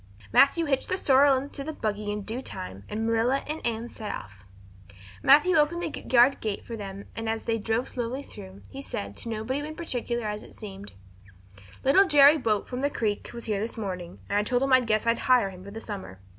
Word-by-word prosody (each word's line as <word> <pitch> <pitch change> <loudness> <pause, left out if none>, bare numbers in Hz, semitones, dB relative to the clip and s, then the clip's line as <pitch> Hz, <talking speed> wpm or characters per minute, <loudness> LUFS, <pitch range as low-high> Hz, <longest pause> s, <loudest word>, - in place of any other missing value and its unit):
Matthew 330 +4 +5
hitched 270 -3 0
the 370 - +1
sorrel 275 -4 +5
into 275 +1 -5
the 315 +2 -5
buggy 210 -5 -3
in 210 0 -4
due 225 +5 -4
time 95 - -8
and 220 +1 -2
Marilla 230 +4 +1
and 305 +2 -5
Anne 230 0 -2
set 220 -2 -6
off. 95 0 -9 0.8
Matthew 300 +6 +6
opened 320 +3 +2
the 325 - -4
yard 255 +2 +6
gate 215 -2 -4
for 230 - -6
them 200 -2 -7
and 225 0 -3
as 225 0 -2
they 225 -1 -1
drove 225 +4 -1
slowly 250 +3 -4
through, 195 -5 -12
he 270 - -7
said, 100 - -5
to - - -5
nobody 225 +5 -2
in 305 +1 -6
particular 240 -8 -3
as 210 0 -3
it - - -13
seemed: 200 -2 -9 0.9
"Little 380 +9 +5
Jerry 295 0 +7
Buote 215 -5 0
from 250 0 -4
the 285 - +2
Creek 215 -7 -2
was 235 -1 -8
here 210 -3 -1
this 225 +3 -4
morning, 180 -5 -5
and 205 - +1
I - - +1
told 245 +4 +1
him 270 -1 +2
I 260 - +8
guessed 220 -3 0
I'd 230 0 +2
hire 245 -6 +3
him 185 -1 -12
for 200 - -9
the 215 +3 -7
summer." 190 - -7
230 Hz, 220 wpm, -27 LUFS, 210-275 Hz, 0.9 s, I